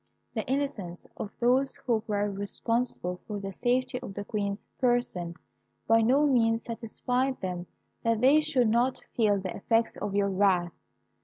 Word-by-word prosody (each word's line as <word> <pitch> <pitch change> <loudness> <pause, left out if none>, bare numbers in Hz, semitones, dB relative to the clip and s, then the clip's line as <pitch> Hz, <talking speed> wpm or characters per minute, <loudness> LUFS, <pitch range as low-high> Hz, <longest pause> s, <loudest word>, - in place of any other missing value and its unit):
The 220 - -1
innocence 250 -10 -2
of 205 - -5
those 255 +3 +3
who 230 -3 +2
were 205 -1 +1
responsible 200 -2 -2
for 210 -2 -4
the 195 -1 -5
safety 250 +3 0
of 195 - -8
the 205 - -5
Queen's 200 -1 -3
person 240 -9 0 0.5
by 225 0 +5
no 265 +6 +4
means 230 -4 +3
satisfied 250 +3 -2
them 180 -1 -4 0.3
that 230 -1 +1
they 275 +6 +6
should 250 -6 +2
not 240 +3 +2 0.2
feel 210 -4 +3
the 190 -1 -5
effects 225 +2 +1
of 200 -1 -3
your 200 -1 +2
wrath. 185 -3 +2
225 Hz, 155 wpm, -28 LUFS, 200-250 Hz, 0.5 s, they